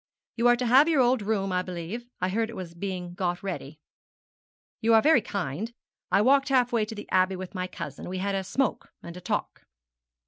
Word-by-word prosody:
'You 235 Hz, +1 st, +3 dB
are 240 Hz, -, +6 dB
to 250 Hz, +1 st, -2 dB
have 265 Hz, +7 st, +6 dB
your 315 Hz, -4 st, +3 dB
old 250 Hz, -1 st, +3 dB
room, 200 Hz, -2 st, -1 dB
I 180 Hz, 0 st, +1 dB
believe; 185 Hz, +6 st, -6 dB
I 185 Hz, -, 0 dB
heard 225 Hz, +3 st, 0 dB
it 230 Hz, -, -8 dB
was 180 Hz, -4 st, -7 dB
being 180 Hz, -1 st, -5 dB
got 175 Hz, 0 st, -2 dB
ready.' 155 Hz, -6 st, -5 dB, 1.0 s
'You 225 Hz, 0 st, +4 dB
are 220 Hz, -, +7 dB
very 300 Hz, -5 st, +5 dB
kind. 195 Hz, -, -4 dB, 0.4 s
I 205 Hz, -, +4 dB
walked 275 Hz, +3 st, +4 dB
half 250 Hz, -2 st, +3 dB
way 225 Hz, -2 st, +2 dB
to 220 Hz, +1 st, -8 dB
the 210 Hz, -, -8 dB
Abbey 185 Hz, +1 st, +3 dB
with 185 Hz, +1 st, -7 dB
my 185 Hz, -1 st, -3 dB
cousin. 150 Hz, -3 st, -7 dB
We 185 Hz, -, -4 dB
had 200 Hz, +2 st, -1 dB
a 195 Hz, 0 st, -1 dB
smoke 265 Hz, +7 st, -1 dB
and 170 Hz, 0 st, -8 dB
a 180 Hz, -, -9 dB
talk.' 180 Hz, -, -3 dB
200 Hz, 215 wpm, -27 LUFS, 180-240 Hz, 1.0 s, are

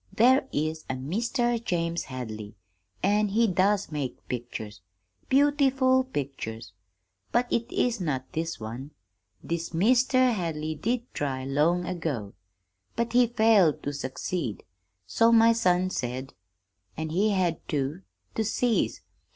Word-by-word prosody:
'There 255 Hz, +6 st, +4 dB
is 155 Hz, +1 st, -2 dB
a 130 Hz, -, -1 dB
Meester 230 Hz, -, 0 dB
James 170 Hz, -5 st, -1 dB
Hadley, 110 Hz, -5 st, -7 dB, 0.5 s
an' 210 Hz, +2 st, +3 dB
he 220 Hz, +4 st, +2 dB
does 195 Hz, -1 st, +1 dB
make 145 Hz, -4 st, -5 dB
pictures 110 Hz, -5 st, -6 dB, 0.5 s
beautiful 270 Hz, -2 st, +3 dB
pictures 120 Hz, -, -5 dB, 0.6 s
but 240 Hz, +1 st, +3 dB
it 235 Hz, +1 st, 0 dB
is 240 Hz, -4 st, 0 dB
not 135 Hz, -6 st, -1 dB
this 165 Hz, -1 st, -3 dB
one. 115 Hz, +6 st, -6 dB, 0.5 s
This 170 Hz, 0 st, -3 dB
Meester 255 Hz, +6 st, +4 dB
Hadley 160 Hz, -6 st, -2 dB
did 235 Hz, +10 st, -1 dB
try, 130 Hz, -2 st, -2 dB
long 155 Hz, +6 st, +2 dB
ago, 155 Hz, -, -3 dB, 0.6 s
but 235 Hz, 0 st, -1 dB
he 245 Hz, 0 st, +5 dB
failed 220 Hz, -8 st, +4 dB
to 145 Hz, -, -3 dB
succeed, 140 Hz, -, -4 dB, 0.4 s
so 230 Hz, -, +3 dB
my 230 Hz, 0 st, +6 dB
son 185 Hz, -4 st, +2 dB
said; 130 Hz, 0 st, -4 dB, 0.6 s
an' 160 Hz, 0 st, -3 dB
he 195 Hz, +7 st, +2 dB
had 180 Hz, -5 st, +1 dB
to 145 Hz, +4 st, -2 dB, 0.3 s
to 220 Hz, -, 0 dB
cease. 225 Hz, +2 st, 0 dB
175 Hz, 125 wpm, -27 LUFS, 140-230 Hz, 0.6 s, my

